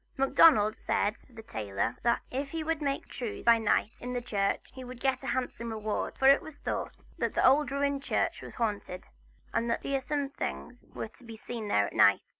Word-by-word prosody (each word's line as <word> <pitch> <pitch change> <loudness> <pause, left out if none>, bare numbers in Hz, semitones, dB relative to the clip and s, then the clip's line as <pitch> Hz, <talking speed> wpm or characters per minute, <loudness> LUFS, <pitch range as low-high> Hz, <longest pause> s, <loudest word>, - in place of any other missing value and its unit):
Macdonald 265 -5 +5
had 205 +1 +1
said - - -22
to 250 - -22
the 225 -1 -10
tailor 105 - -2
that 235 0 +2
if 275 +2 -3
he 325 +1 -3
would 320 0 -1
make 280 -1 -1
the - - -16
trews 240 -5 -5
by 230 -1 +6
night 220 0 0
in 250 0 -4
the 245 - 0
church 200 -4 0
he 260 - -8
would 250 -1 -9
get 265 -1 0
a 270 - -7
handsome 245 -2 -2
reward. 215 -1 -3
For 265 - +4
it 275 +1 +7
was 315 -2 -10
thought - - -4 0.2
that - - -1
the - - +3
old 280 +3 +4
ruined 280 0 0
church - - -1
was - - -10
haunted, 205 -6 -3 0.4
and 235 - 0
that 230 - -1
fearsome 275 +1 -1
things 245 -2 -6
were 220 - -4
to 250 - -21
be 225 -1 -9
seen 225 -1 -6
there 100 - +3
at - - -7
night. - - +5
245 Hz, 225 wpm, -30 LUFS, 220-275 Hz, 0.4 s, it